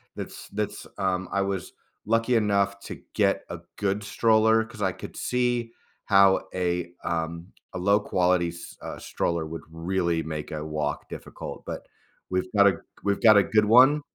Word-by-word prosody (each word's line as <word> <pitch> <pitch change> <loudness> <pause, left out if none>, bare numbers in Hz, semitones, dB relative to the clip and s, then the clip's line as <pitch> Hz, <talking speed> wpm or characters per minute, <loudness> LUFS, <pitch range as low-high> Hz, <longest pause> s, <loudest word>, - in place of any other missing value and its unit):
that's - - -7
that's, 105 0 -4
um 90 -1 -1
I 100 - +1
was 95 -3 -3 0.3
lucky 115 +3 +2
enough 100 -2 +2
to - - -8
get - - +2
a - - -6 0.2
good 100 +1 -1
stroller, 110 +1 +3
'cause 110 -2 -12
I 95 - +2
could - - -10
see 120 -2 -1 0.3
how 100 -2 +5
a, 90 -1 -1
um, 85 0 -3 0.3
a - - -4
low 100 +3 +3
quality 90 -3 +1
s 85 0 -10
uh, - - -6
stroller 85 -2 -2
would 80 +1 -6
really 85 0 -1
make 75 -1 -5
a 75 0 -4
walk 75 -2 -3
difficult, - - -8
but - - -6 0.5
we've 95 0 -1
got 100 0 +6
a 95 - +3 0.3
we've 100 0 0
got 110 -3 +8
a 100 - +6
good 110 +1 +3
one. 130 +7 +6
95 Hz, 170 wpm, -26 LUFS, 85-110 Hz, 0.5 s, got